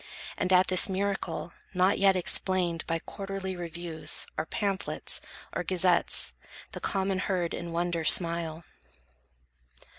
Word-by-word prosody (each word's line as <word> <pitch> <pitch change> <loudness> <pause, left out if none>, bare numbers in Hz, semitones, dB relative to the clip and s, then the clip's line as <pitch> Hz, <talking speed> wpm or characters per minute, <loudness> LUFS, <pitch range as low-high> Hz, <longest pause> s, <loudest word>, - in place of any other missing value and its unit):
And 185 - -1
at 185 0 +6
this 185 +1 +3
miracle, 190 -3 -3 0.2
not 185 +2 +3
yet 195 -1 +4
explained 180 -2 +2
By 165 - 0
quarterly 195 +2 -6
reviews, 170 -2 -1
or 155 - -3
pamphlets, 200 -2 -2 0.3
or - - -2
Gazettes, 180 -1 +2 0.4
the - - -7
common 195 -1 -1
herd 180 -3 -1
in 170 -1 -5
wonder 170 0 -1
smile. 165 0 +4
180 Hz, 120 wpm, -28 LUFS, 170-190 Hz, 0.4 s, at